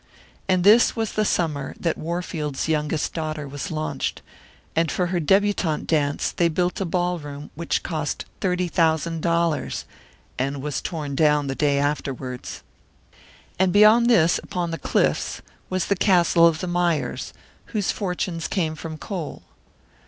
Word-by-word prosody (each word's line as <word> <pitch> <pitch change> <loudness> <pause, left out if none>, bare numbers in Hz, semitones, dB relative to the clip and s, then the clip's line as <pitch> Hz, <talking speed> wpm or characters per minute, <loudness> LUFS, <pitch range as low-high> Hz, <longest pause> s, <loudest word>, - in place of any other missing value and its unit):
And 185 -1 +3
this 215 +5 +6
was 225 -2 -1
the 215 - +1
summer 155 -8 -1
that 165 -2 0
Warfield's 160 -4 -3
youngest 150 -1 0
daughter 155 -2 -3
was 140 -2 -5
launched, 155 -1 -3 0.5
and 165 0 +2
for 180 - 0
her 175 - +2
debutante 190 -2 +2
dance 145 -3 0
they 170 - +2
built 180 +3 -1
a - - 0
ballroom 165 -5 -3
which 170 +2 -2
cost 155 -3 -3
thirty 180 -1 0
thousand 165 -1 +1
dollars 170 -1 0 0.5
and 140 +2 -1
was 150 -2 -2
torn 150 -5 -4
down 150 0 +3
the 135 - -2
day 140 0 +1
afterwards! 135 -3 -3 1.0
And 190 -1 +3
beyond 215 +4 +6
this, 170 -8 +4
upon 175 -2 -3
the 165 - -4
cliffs, - - 0 0.3
was 185 -1 0
the 200 - +1
castle 175 -3 +5
of 155 -2 0
the 185 - -3
Mayers, 175 -3 -1 0.3
whose 210 -5 -1
fortunes 180 -4 -3
came 165 -6 -1
from 160 0 -7
coal. 165 +2 -6
165 Hz, 145 wpm, -23 LUFS, 150-180 Hz, 1.0 s, this